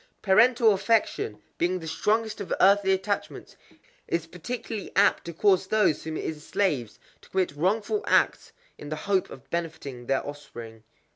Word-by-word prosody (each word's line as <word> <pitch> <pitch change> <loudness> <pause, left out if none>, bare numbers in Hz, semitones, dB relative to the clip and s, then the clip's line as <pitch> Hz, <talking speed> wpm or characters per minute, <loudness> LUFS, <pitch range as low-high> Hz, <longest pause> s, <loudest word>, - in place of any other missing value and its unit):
Parental 225 +3 +5
affection, 190 - 0 0.2
being 180 +2 +1
the 165 -2 -8
strongest 215 +6 0
of 200 - -7
earthly 195 0 +5
attachments, 195 +2 -2 0.5
is 170 -1 -1
particularly 200 +5 -6
apt 200 - +3
to 170 - -5
cause 190 +2 +2
those 210 -6 +2
whom 160 -1 -4
it - - -5
enslaves 150 - -2 0.2
to - - -19
commit 190 -4 0
wrongful 210 - 0
acts - - +2 0.3
in 150 - -8
the 155 - -2
hope 195 -2 +1
of 130 - -12
benefiting 150 -7 -5
their 135 0 0
offspring. 120 -6 -9
185 Hz, 150 wpm, -26 LUFS, 155-205 Hz, 0.5 s, Parental